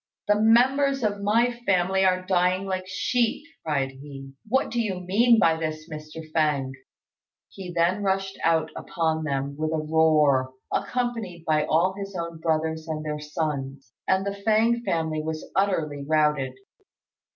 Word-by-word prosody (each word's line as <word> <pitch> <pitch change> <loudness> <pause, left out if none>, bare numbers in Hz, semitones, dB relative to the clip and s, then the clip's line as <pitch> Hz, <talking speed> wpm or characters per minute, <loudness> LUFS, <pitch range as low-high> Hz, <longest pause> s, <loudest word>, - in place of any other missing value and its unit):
"The 210 0 +3
members 265 +4 +4
of 205 -1 -1
my 230 +4 +3 0.2
family 190 0 +2
are 185 -1 +2
dying 185 +1 +1
like 185 -1 -3
sheep," 225 - 0 0.2
cried 140 -4 -1
he; 135 0 -11
"what 265 +5 +1
do 240 - 0
you 195 -5 -2
mean 225 +6 +4
by 165 -5 +4
this, 155 -1 -4
Mr. 155 0 -8
Fêng?" 145 -4 +1 0.8
He 185 -2 -8
then 175 +4 +1
rushed 195 0 -1
out 160 -1 +2
upon 160 -1 -1
them 140 -1 -2
with 155 0 -1
a 160 - 0
roar, 155 -4 +3 0.2
accompanied 230 -9 -2
by 155 -1 +2
all 170 +4 +2
his 200 0 -7
own 170 -2 -5
brothers 160 0 -1
and 155 -1 -4
their 150 0 -3
sons; 140 -5 -4
and 190 +1 +2
the 200 - -1
Fêng 225 +2 +3
family 160 -5 -1
was 155 0 -5
utterly 165 -7 0
routed. 150 -3 +1
165 Hz, 150 wpm, -25 LUFS, 155-195 Hz, 0.8 s, members